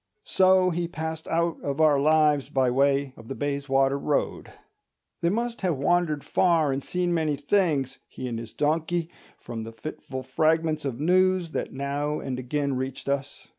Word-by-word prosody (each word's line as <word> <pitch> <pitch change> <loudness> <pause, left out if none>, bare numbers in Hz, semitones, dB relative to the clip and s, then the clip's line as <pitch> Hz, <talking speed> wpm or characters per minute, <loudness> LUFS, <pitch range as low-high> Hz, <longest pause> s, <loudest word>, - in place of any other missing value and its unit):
So 185 -1 +4
he 170 0 -1
passed 160 -1 -5
out 170 0 0
of 140 +1 -3
our 150 -3 +5
lives 150 -1 +3
by 130 -2 +2
way 140 +1 +2
of 115 - -13
the 135 - -5
Bayswater 140 -1 0
Road. 145 +1 -1 0.7
They 170 - +2
must 235 +4 -2
have 180 -7 0
wandered 155 0 +1
far 165 -5 +2
and 135 0 -2
seen 180 -1 -1
many 155 -3 +1
things, 145 -4 0
he 130 - -7
and 115 -2 -3
his 115 -1 -8
donkey, 160 +3 0 0.3
from 115 -2 -7
the 110 +1 -7
fitful 130 +2 -7
fragments 155 +3 +1
of 130 -3 -3
news 185 +1 +2
that - - -3
now 140 +2 -2
and 130 -2 -4
again 140 +2 -1
reached 130 +1 -4
us. 140 0 -3
150 Hz, 170 wpm, -26 LUFS, 135-165 Hz, 0.7 s, our